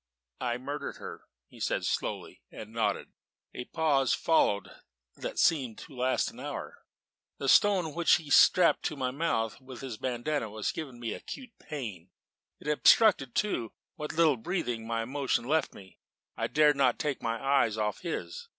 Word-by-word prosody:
"I 120 -1 -1
murdered 140 +3 -5
her," - - -9 0.2
he - - -17
said - - -1
slowly, - - -3
and 110 +1 -10
nodded. 115 -1 -1 0.4
A 125 - -6
pause 145 -5 +2
followed 105 -11 +2 0.4
that - - -6
seemed 130 -9 +2
to 145 - -11
last 130 +1 0
an - - -14
hour. - - -6 0.6
The 135 - -4
stone 185 -1 +4
which 170 +1 +4
he 165 - -3
had 145 - -1
strapped 180 - +5
in 155 - -8
my 130 -2 -1
mouth 125 -7 -1
with 130 -2 -10
his 130 -5 -6
bandanna 125 +1 -2
was 105 0 -2
giving 135 -7 -7
me 115 -2 -3
acute 255 -3 -8
pain; 105 - -7 0.5
it - - -11
obstructed, 150 - +4
too, 125 - -1 0.2
what 150 -1 -6
little 160 -4 +4
breathing 120 -5 -3
my 115 0 -1
emotion 130 -1 -1
left 155 +3 0
me; 95 -2 -14 0.4
and - - -1
I - - -1
dared 150 -1 +4
not 130 -3 +3
take 145 -3 -2
my 115 0 -2
eyes 135 -6 +2
off 105 -1 -1
his. 460 - -5
135 Hz, 170 wpm, -29 LUFS, 115-155 Hz, 0.6 s, strapped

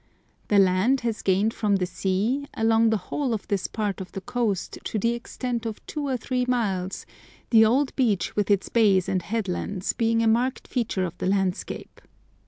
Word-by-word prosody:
The 205 - +3
land 195 +7 +4
has 230 -2 -2
gained 200 +4 +2
from 210 -3 +1
the 185 -2 +1
sea 205 +10 -1
along 225 0 +3
the 220 - +2
whole 265 -6 0
of 210 - -7
this 190 -4 0
part 205 -2 -3
of 185 - -8
the 195 - -5
coast 220 -4 -2
to - - -3
the 230 +3 +1
extent 235 0 -4
of 220 - -7
two 295 -2 -4
or 260 -2 0
three 250 +2 -1
miles, 195 -7 -1 0.5
the 220 -2 +7
old 260 +5 +2
beach 210 -9 +1
with 205 -1 0
its 200 -2 +2
bays 200 -6 +3
and 185 -1 0
headlands 200 -2 -2
being 230 0 +1
a - - +2
marked 245 +4 +1
feature 220 -7 -1
of 170 - -6
the - - -1
landscape. 190 -1 -2
220 Hz, 190 wpm, -25 LUFS, 195-235 Hz, 0.5 s, the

